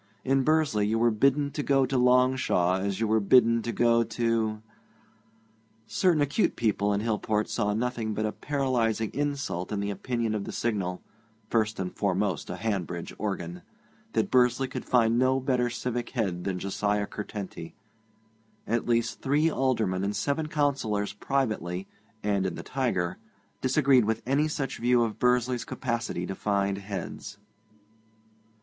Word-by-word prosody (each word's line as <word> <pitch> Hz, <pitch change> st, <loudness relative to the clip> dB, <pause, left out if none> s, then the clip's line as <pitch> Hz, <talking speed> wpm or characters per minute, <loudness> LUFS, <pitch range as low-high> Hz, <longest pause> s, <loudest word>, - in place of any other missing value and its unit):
In 135 Hz, +1 st, +3 dB
Bursley 140 Hz, -8 st, +2 dB
you 110 Hz, +2 st, +1 dB
were 120 Hz, +1 st, +3 dB
bidden 140 Hz, +6 st, +2 dB
to 145 Hz, -, -3 dB
go 135 Hz, -1 st, +3 dB
to 130 Hz, +1 st, -3 dB
Longshaw 125 Hz, -8 st, +3 dB
as 100 Hz, 0 st, -2 dB
you 115 Hz, -, +1 dB
were 110 Hz, +1 st, +3 dB
bidden 115 Hz, +2 st, +5 dB
to 120 Hz, -, -3 dB
go 115 Hz, 0 st, +3 dB
to... 115 Hz, -2 st, -1 dB, 1.2 s
Certain 165 Hz, +4 st, +2 dB
acute 145 Hz, +9 st, +1 dB
people 105 Hz, -3 st, +1 dB
in 100 Hz, 0 st, 0 dB
Hillport 110 Hz, -1 st, 0 dB
saw 105 Hz, 0 st, 0 dB
nothing 115 Hz, -2 st, -2 dB
but 110 Hz, -, -1 dB
a 110 Hz, -, -1 dB
paralyzing 120 Hz, -7 st, -1 dB
insult 140 Hz, -10 st, -2 dB
in 105 Hz, -, -1 dB
the 100 Hz, 0 st, -2 dB
opinion 115 Hz, 0 st, -2 dB
of 105 Hz, -2 st, -2 dB
the -, -, -5 dB
Signal 95 Hz, -6 st, -2 dB, 0.5 s
(first 110 Hz, -2 st, +1 dB
and 90 Hz, -1 st, -4 dB
foremost 95 Hz, -3 st, -1 dB
a -, -, -3 dB
Hanbridge 90 Hz, -6 st, -3 dB
organ), 90 Hz, -4 st, -3 dB, 0.5 s
that 110 Hz, -, 0 dB
Bursley 125 Hz, +1 st, +3 dB
could 130 Hz, -, -6 dB
find 115 Hz, -1 st, +3 dB
no 130 Hz, +1 st, +3 dB
better 125 Hz, -2 st, +1 dB
civic 120 Hz, 0 st, -3 dB
head 95 Hz, -8 st, -2 dB
than 95 Hz, -2 st, -1 dB
Josiah 100 Hz, +2 st, -1 dB
Curtenty. 100 Hz, -5 st, -7 dB, 0.9 s
At 115 Hz, +1 st, -1 dB
least 115 Hz, -1 st, 0 dB
three 150 Hz, +4 st, +2 dB
Aldermen 110 Hz, -10 st, 0 dB
and 100 Hz, +1 st, -1 dB
seven 150 Hz, +2 st, -1 dB
Councillors 140 Hz, -9 st, 0 dB
privately, 105 Hz, -7 st, -2 dB, 0.4 s
and 100 Hz, -2 st, +1 dB
in 90 Hz, -, -4 dB
the -, -, -7 dB
Tiger, 110 Hz, -11 st, -1 dB, 0.4 s
disagreed 130 Hz, -2 st, +4 dB
with 110 Hz, +1 st, -1 dB
any 140 Hz, +4 st, +2 dB
such 145 Hz, -3 st, -3 dB
view 120 Hz, 0 st, +3 dB
of 110 Hz, -2 st, -3 dB
Bursley's 125 Hz, 0 st, +2 dB
capacity 115 Hz, -8 st, -3 dB
to 95 Hz, -, -4 dB
find 100 Hz, 0 st, 0 dB
heads. 100 Hz, 0 st, -6 dB
115 Hz, 155 wpm, -27 LUFS, 100-130 Hz, 1.2 s, bidden